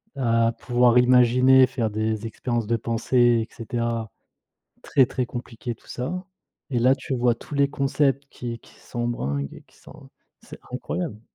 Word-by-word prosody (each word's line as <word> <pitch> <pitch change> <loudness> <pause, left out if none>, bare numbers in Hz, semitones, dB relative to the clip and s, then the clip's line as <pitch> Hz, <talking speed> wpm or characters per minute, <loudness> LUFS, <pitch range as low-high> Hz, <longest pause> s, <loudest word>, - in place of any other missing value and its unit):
à 115 -3 +2
pouvoir 120 0 +3
imaginer, 125 +1 +6
faire 125 -4 -2
des 110 +1 -2
expériences 115 +1 -2
de 115 +2 +1
pensées 115 0 +2
et - - -25
cetera, 115 -1 -3 0.7
très, 135 - +3
très 125 0 -2
compliqué 120 -1 -6
tout - - -25
ça, 180 +9 -4 0.5
et 120 - +1
là, 125 +3 +5
tu 135 0 -4
vois 120 -1 +2
tous 145 - -9
les 140 0 +3
concepts 140 0 0
qui 120 -1 -6
qui - - -20
sont 120 0 -4
bringues 70 - -3
et - - -12
qui - - -27
sont - - -15 0.3
c'est - - -12
incroyable! 145 - -4
120 Hz, 165 wpm, -24 LUFS, 115-130 Hz, 0.7 s, imaginer